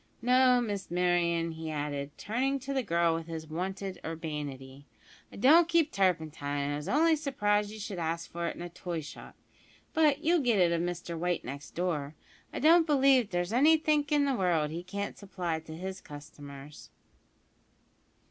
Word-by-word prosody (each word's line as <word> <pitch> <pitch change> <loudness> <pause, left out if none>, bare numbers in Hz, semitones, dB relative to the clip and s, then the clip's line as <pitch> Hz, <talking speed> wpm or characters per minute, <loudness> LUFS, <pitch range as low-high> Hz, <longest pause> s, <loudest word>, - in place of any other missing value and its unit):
No, 250 0 +5
Miss 205 -4 -4
Merryon," 175 -1 +1
he 160 0 -6
added, 145 -1 -4
turning 260 +6 -1
to 275 +2 -4
the 265 - +1
girl 170 -6 +1
with 165 0 -4
his 160 -1 -6
wonted 190 +4 -5
urbanity, 145 -4 -6 0.4
"I - - -12
don't 315 +10 +6
keep 335 -2 +2
turpentine, 160 -6 0
and 140 +1 -1
I - - -2
was 150 - -6
only 320 +3 +4
surprised 210 -9 0
you 215 - -9
should 200 -3 -5
ask 165 0 -3
for 170 0 -3
it - - -4
in - - -7
a 175 - -6
toy 170 -1 -5
shop; 150 - -11 0.6
but 305 -2 +3
you'll 340 +2 +3
get 245 -6 +2
it 175 -3 +4
of 170 -1 +1
Mr 175 -1 -4
White 175 +1 -2
next 140 +4 -8
door. 155 -4 -2 0.4
I - - -6
don't 325 +3 +5
believe 270 -6 +4
there's 175 +2 -2
anythink 300 +2 +3
in 290 -1 +3
the 275 - +1
world 170 -8 +1
as - - -5
he 170 - -4
can't 200 +3 -5
supply 180 -5 -3
to 160 0 -10
his 190 +2 -6
customers." 145 -1 -11
175 Hz, 180 wpm, -30 LUFS, 160-250 Hz, 0.6 s, don't